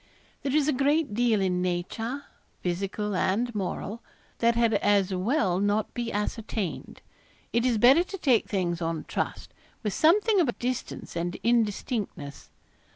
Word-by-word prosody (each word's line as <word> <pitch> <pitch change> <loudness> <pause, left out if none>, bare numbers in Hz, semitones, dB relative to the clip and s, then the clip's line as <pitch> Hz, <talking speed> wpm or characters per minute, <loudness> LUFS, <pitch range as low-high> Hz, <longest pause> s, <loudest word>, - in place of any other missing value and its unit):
There 275 0 -1
is 300 -2 +3
a 305 - +3
great 280 0 +1
deal 225 -2 +2
in 180 -1 +1
nature, 225 +9 -2 0.4
physical 195 +3 -2
and 230 +7 0
moral, 205 +2 -4 0.4
that 235 0 +3
had 230 -1 +3
as 200 -2 +2
well 185 - +1
not 205 +1 0
be 240 -1 -3
ascertained. 210 -2 -4 0.5
It 235 +2 +2
is 240 -3 +2
better 265 +10 +6
to 390 - -7
take 260 - +2
things 175 -4 -1
on 165 -1 -2
trust, - - -4 0.3
with 210 -3 -1
something 400 - +4
of 280 -9 +1
distance 250 -5 -4
and 175 +1 -2
indistinctness. 215 - -1
220 Hz, 145 wpm, -27 LUFS, 190-250 Hz, 0.5 s, better